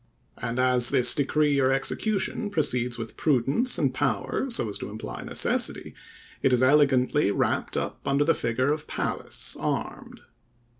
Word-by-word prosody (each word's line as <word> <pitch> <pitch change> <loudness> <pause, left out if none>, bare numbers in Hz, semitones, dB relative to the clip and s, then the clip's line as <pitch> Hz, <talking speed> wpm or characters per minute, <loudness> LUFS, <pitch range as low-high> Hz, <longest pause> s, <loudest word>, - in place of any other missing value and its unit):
And 120 +1 -4
as 125 -1 +4
this 125 - +5
decree 145 0 +1
or 130 0 +2
execution 200 +9 -1
proceeds 125 -9 -1
with 115 -1 -8
prudence 145 - +2
and - - 0
power, 270 - -2
so 230 - -1
as 105 - -6
to - - -6
imply 110 +1 -8
necessity, - - 0 0.5
it 135 - +2
is 125 0 +3
elegantly 140 -2 +3
wrapped 100 - -1
up - - -4
under 140 +1 +2
the 165 +2 +2
figure 130 +5 -1
of 150 -1 -7
Pallas - - -3
armed. - - -5
135 Hz, 150 wpm, -25 LUFS, 125-150 Hz, 0.5 s, this